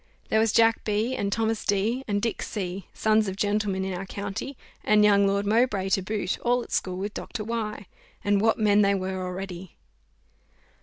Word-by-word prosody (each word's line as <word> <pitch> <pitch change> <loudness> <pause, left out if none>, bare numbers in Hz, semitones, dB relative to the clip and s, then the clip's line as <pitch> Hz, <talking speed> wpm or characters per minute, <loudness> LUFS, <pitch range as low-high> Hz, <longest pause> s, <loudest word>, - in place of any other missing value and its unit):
"There 220 - +3
was 225 -1 +3
Jack 225 0 +4
B, 215 +4 0
and 200 -4 -2
Thomas 225 +1 0
D, 215 +6 0
and 205 -1 -1
Dick 230 - -1
C, 190 -3 -4
sons 215 -1 +2
of 190 - -3
gentlemen 205 -2 0
in 190 - -3
our 185 +2 -5
county, 205 +8 -5 0.3
and 210 0 +4
young 200 -1 +5
Lord 200 +1 0
Mowbray 210 -3 +2
to 195 - +2
boot, 200 -1 -2
all 245 0 +1
at - - -14
school 185 -1 -1
with 205 +2 -4
Dr. 215 - -5
Y, 215 -2 -4 0.4
and 205 -1 +2
what 225 +1 +3
men 210 -1 +4
they 200 -1 +3
were 190 -1 -3
already!" 185 -1 -6
205 Hz, 190 wpm, -26 LUFS, 195-220 Hz, 0.4 s, young